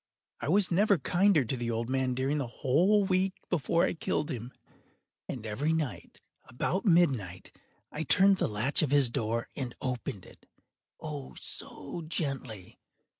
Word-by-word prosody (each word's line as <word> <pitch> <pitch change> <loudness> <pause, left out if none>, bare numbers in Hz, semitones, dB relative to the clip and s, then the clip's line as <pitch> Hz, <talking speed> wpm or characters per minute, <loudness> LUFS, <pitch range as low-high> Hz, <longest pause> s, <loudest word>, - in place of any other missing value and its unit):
I - - -4
was 190 +2 +3
never 200 +2 +4
kinder 175 0 +3
to 125 - -1
the 120 -1 -3
old 115 0 -2
man 130 +1 0
than 125 - -1
during 135 +3 0
the 135 - -2
whole 175 - +2
week 190 0 +1 0.2
before 170 0 +2
I - - +1
killed 160 -1 -2
him. 120 -1 -5 0.8
And 120 -4 -5
every 135 +9 0
night, 130 - -4 0.2
about 185 - -2
midnight, 130 - +2 0.4
I 150 - -4
turned 195 +4 +5
the - - +1
latch 110 +7 0
of 155 - +1
his 140 -4 +3
door 115 +1 -1
and 130 -4 -4
opened 120 -7 -4
it—oh, 145 -4 -11
so 170 - -7
gently! 135 - -4
140 Hz, 155 wpm, -30 LUFS, 120-170 Hz, 0.8 s, turned